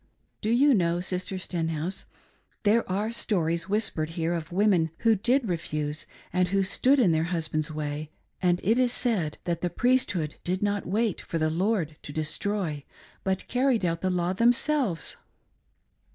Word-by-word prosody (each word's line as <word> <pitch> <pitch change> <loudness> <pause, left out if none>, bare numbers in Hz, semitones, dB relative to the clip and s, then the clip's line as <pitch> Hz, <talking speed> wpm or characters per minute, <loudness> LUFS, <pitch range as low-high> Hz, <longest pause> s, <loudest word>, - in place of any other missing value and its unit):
Do 215 - -1
you 270 +5 +5
know, 170 -5 +2
Sister 185 +1 -1
Stenhouse, 165 0 -3 0.6
there 215 -1 +2
are 210 +4 0
stories 170 -6 -1
whispered 195 -7 0
here 165 +1 0
of 165 -1 -4
women 185 -3 +3
who 230 -1 +5
did 245 +5 +2
refuse 155 -3 -2 0.3
and 180 0 +2
who 195 +2 +1
stood 265 +8 +3
in 205 -9 +4
their 160 0 +1
husband's 155 -3 -2
way, 150 0 -4 0.3
and 175 -1 +2
it 225 +6 +3
is 250 -1 +3
said 195 -12 +2
that 170 -1 -2
the 175 - 0
Priesthood 205 - +1
did 185 +3 -1
not 205 -1 -1
wait 210 +1 0
for 165 - -4
the 155 -1 +1
Lord 175 -3 0
to - - -7
destroy,. 155 0 -2 0.4
but 190 0 -1
carried 250 -5 +2
out 165 -1 -1
the 185 - +1
law 180 0 0
them 235 +5 +4
selves. 250 - -1
180 Hz, 165 wpm, -27 LUFS, 165-215 Hz, 0.6 s, you